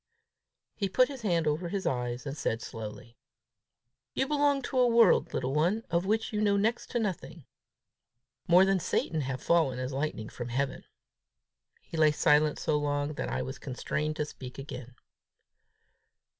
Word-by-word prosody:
He 200 -2 -2
put 255 +7 +4
his 270 -3 -7
hand 170 -7 +1
over 155 +3 0
his 195 +1 -3
eyes, 125 0 -2
and 140 0 -4
said 115 -6 -1
slowly, 115 +1 -8 1.0
"You 265 - +1
belong 285 -2 +2
to 260 - -1
a 250 - +5
world, 230 -1 +5
little 130 +1 -2
one, 175 +9 +1
of 170 +2 +1
which 220 +2 0
you 210 - 0
know 205 -1 +3
next 225 +4 0
to 240 - -1
nothing. 180 - -4 1.0
More 180 +2 +7
than 195 -1 +2
Satan 160 -2 -1
have 130 -1 -4
fallen 160 -7 +2
as 130 +1 -3
lightning 135 -6 -3
from 120 -1 -6
heaven!" 135 +3 -2 1.0
He 165 - -7
lay 155 -1 +5
silent 150 0 +3
so 150 -2 0
long 145 0 -1
that - - -4
I 65 +1 -2
was 65 - -6
constrained 150 +3 -3
to 150 - -1
speak 130 -3 -10
again. 130 -3 -8
155 Hz, 165 wpm, -29 LUFS, 130-200 Hz, 1.0 s, More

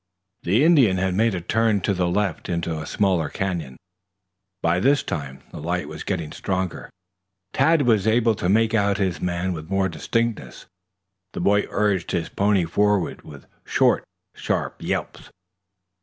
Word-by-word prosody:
The 105 +10 +2
Indian 140 - +5
had 95 0 0
made 110 +2 +2
a 90 - -3
turn 110 +3 +1
to 100 - 0
the 90 -2 0
left 95 -2 -1
into 85 -1 -2
a 75 - -7
smaller 90 -7 +1
canyon. 85 -10 -4 0.9
By 85 +2 +2
this 140 +7 +3
time 70 -4 -5
the - - -8
light - - -2
was - - -8
getting 80 -5 -3
stronger. 95 -2 -3 0.6
Tad 150 +3 +3
was 110 -4 +2
able 115 0 +3
to 90 -3 -2
make 110 +2 +3
out 100 -2 +2
his 95 -4 -1
man 90 +1 -1
with 80 0 -8
more 95 0 +1
distinctness. 105 - -3 0.7
The - - -5
boy 105 +1 +2
urged 100 -4 0
his 85 -3 -1
pony 100 -3 +1
forward 100 0 0
with 70 -3 -13 0.2
short, - - +2 0.3
sharp - - -2
yelps. - - -4
95 Hz, 155 wpm, -23 LUFS, 85-105 Hz, 0.9 s, Indian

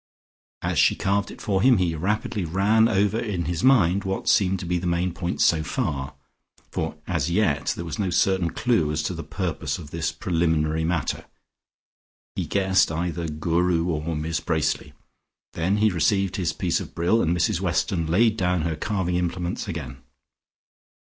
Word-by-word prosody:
As - - 0
she - - +4
carved 100 +1 0
it - - -11
for 95 -2 0
him, 125 +1 +5
he 90 -3 +1
rapidly 100 +4 -1
ran 100 +7 +3
over 105 0 +1
in 95 -7 -2
his 85 +5 -2
mind 100 -8 +4
what 95 -1 -3
seemed 95 -1 +3
to - - -5
be 90 0 0
the 90 - -3
main 85 +1 0
points 90 0 0
so 80 -2 +3
far, 75 - -3 0.6
for - - -3
as - - -1
yet 85 -7 +1
there 85 - -6
was 85 +6 -5
no 100 -3 0
certain 95 -1 +2
clue 85 -8 +1
as 75 0 -1
to 90 - -2
the 85 - -5
purpose 80 -7 -3
of 75 -4 -10
this 80 0 -2
preliminary 80 -2 0
matter, 85 +1 -1 1.1
he - - -2
guessed 95 -3 +2
either 85 +1 -2
Guru 85 +2 0
or 80 0 -2
Miss 80 +1 -2
Bracely. 80 -3 -1 0.6
Then 90 +5 0
he 105 0 +3
received 95 +3 +1
his 90 -3 0
piece - - -1
of - - -9
brill, 90 +7 +2
and 85 +2 +1
Mrs 85 - +1
Weston 85 -4 0
laid 110 +6 +3
down 90 -4 +1
her 80 -1 -1
carving 90 +1 -1
implements 90 +1 -2
again. 80 -10 -5
90 Hz, 175 wpm, -24 LUFS, 80-95 Hz, 1.1 s, him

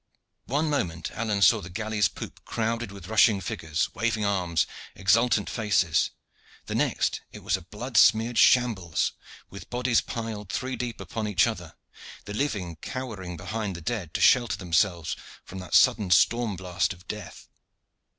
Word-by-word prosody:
One 150 +5 0
moment 85 - -2
Alleyne 105 -3 0
saw 110 0 +6
the 90 - -9
galley's 105 +1 0
poop - - -9
crowded 115 -1 -2
with 100 -3 -10
rushing 110 -1 +4
figures, 80 -2 -2
waving 115 -2 0
arms, 90 -5 +1 0.3
exultant 105 +2 +3
faces; 100 -8 +1 0.6
the - - -5
next - - 0
it - - -11
was - - +1
a - - -5
blood - - -5
smeared 115 +2 +5
shambles, 105 -10 +3 0.4
with 100 - -10
bodies 125 -1 +2
piled 110 -4 -5
three 130 +2 -2
deep 120 -2 -4
upon 105 +3 -4
each 95 -4 +3
other, - - -5 0.5
the 105 - -6
living 105 - -2
cowering 95 -5 -6
behind 105 0 -4
the - - -6
dead 90 -3 -4
to - - -1
shelter 120 -2 +4
themselves 85 -2 0 0.3
from 95 - -9
that 90 - -3
sudden 100 -4 +5
storm 115 +4 +3
blast 90 +1 -1
of 90 0 -19
death. 105 -1 -8
105 Hz, 155 wpm, -26 LUFS, 90-115 Hz, 0.6 s, saw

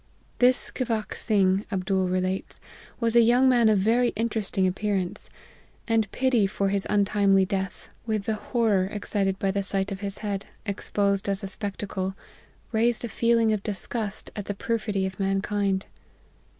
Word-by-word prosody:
This 250 0 +5
Scivac 225 -4 -2
Sing, 195 -2 +2
Abdool 190 -1 0
relates, 185 +1 -2 0.4
was 230 -1 0
a 235 - +8
young 245 +3 +4
man 240 -3 +5
of 215 - +4
very 230 +5 +3
interesting 215 -3 0
appearance; 190 -1 -2 0.6
and 225 -3 +1
pity 250 -6 +2
for 195 0 -1
his 200 0 0
untimely 200 -1 +3
death, 190 -1 -4 0.2
with 215 -2 0
the 220 - -1
horror 215 -3 +1
excited 200 -1 -1
by 195 0 0
the 200 - -1
APPENDIX. 195 - +1
203 195 - +3
sight 195 +2 -2
of 195 - -4
his 200 0 -3
head, 200 -2 -3 0.2
exposed 200 -1 -1
as 200 +1 0
a - - -3
spectacle, 195 -1 -2 0.6
raised 235 +1 +1
a - - -5
feeling 230 0 +2
of 210 - -1
disgust 210 0 -4
at 205 - -5
the 205 - -4
perfidy 210 -2 -1
of 190 +1 -5
mankind. 195 0 0
205 Hz, 165 wpm, -26 LUFS, 195-225 Hz, 0.6 s, a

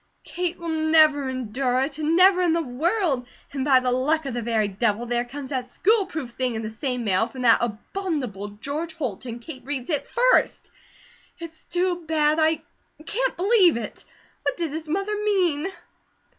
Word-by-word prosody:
Kate 355 -1 -3
will 320 -2 -2
never 305 -4 +5
endure 255 0 -1
it, 280 +2 -3
never 360 +5 +5
in 345 -3 +3
the 335 - +1
world! 305 - 0 0.3
And 270 -2 -2
by 265 -2 +5
the 255 -1 0
luck 290 +5 +1
of 270 - -3
the 240 - -2
very 220 -2 +1
Devil, 210 +3 -1
there 240 0 0
comes 270 +2 -8
that 255 -2 -2
school 410 - +2
proof 305 -9 -5
thing 250 -1 -2
in 220 - -3
the 215 - -4
same 250 +1 -3
mail, 205 +1 +2
from 250 +1 -7
that 230 -2 +6
abominable 240 - -3
George 280 +11 -5
Holt, 255 - -4
and 235 0 -6
Kate 260 +1 -10
reads 270 +1 -4
it 295 - -1
FIRST. - - +2 0.7
It's 335 -2 -9
too 355 0 -1
bad! 310 0 +2
I 315 0 +2 0.4
can't - - -1
believe 375 - +4
it! 235 - -6 0.4
What - - -1
did 330 -4 -2
his 315 0 -6
mother 395 +5 -1
mean?" 380 -7 +1
290 Hz, 180 wpm, -24 LUFS, 245-335 Hz, 0.7 s, that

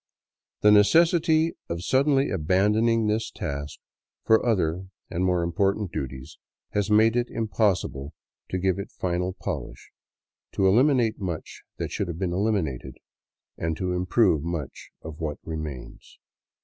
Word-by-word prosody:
The 105 - +6
necessity 160 - +4 0.2
of 85 +1 -4
suddenly 135 +4 +2
abandoning 105 +6 +2
this 110 +1 0
task 70 +1 -5 0.5
for 110 0 +4
other 95 -5 0 0.2
and 90 - -1
more 90 -2 +1
important 95 +3 0
duties 65 +1 -6 0.3
has 105 0 -1
made 110 +2 +4
it 120 0 0
impossible 95 - -1 0.3
to 95 - -2
give 95 0 0
it 100 - -5
final 90 0 -2
polish, - - -6 0.6
to 95 - +1
eliminate 120 +2 +3
much 85 -5 -5 0.2
that - - -4
should 100 - -2
have 85 -2 -5
been 90 -1 -2
eliminated, 90 - -1 0.6
and 80 -1 -2
to 90 -1 -2
improve 90 -2 +2
much 80 -3 -5
of 80 -1 -8
what 75 -2 -3
remains. 75 -5 -7
95 Hz, 135 wpm, -25 LUFS, 80-110 Hz, 0.6 s, The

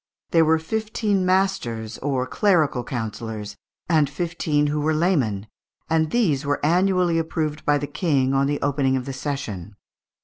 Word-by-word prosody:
There 165 -1 +5
were 160 +1 +4
fifteen 210 +2 -1
masters 185 - 0
(maistres) 145 - -3
or 130 -2 0
clerical 160 - +2
councillors, 110 -4 -5 0.3
and 155 -5 +3
fifteen 155 -2 -1
who 150 0 0
were 155 +1 +1
laymen, 135 - +1 0.5
and 160 -1 +2
these 165 - +1
were 145 0 0
annually 180 0 +3
approved 155 -2 -2
by 145 0 +3
the 145 - -3
King 140 -3 0
on 135 0 +2
the 145 0 -1
opening 135 -2 +1
of 125 - -4
the 135 - -5
session. 115 - -5
150 Hz, 160 wpm, -23 LUFS, 130-170 Hz, 0.5 s, There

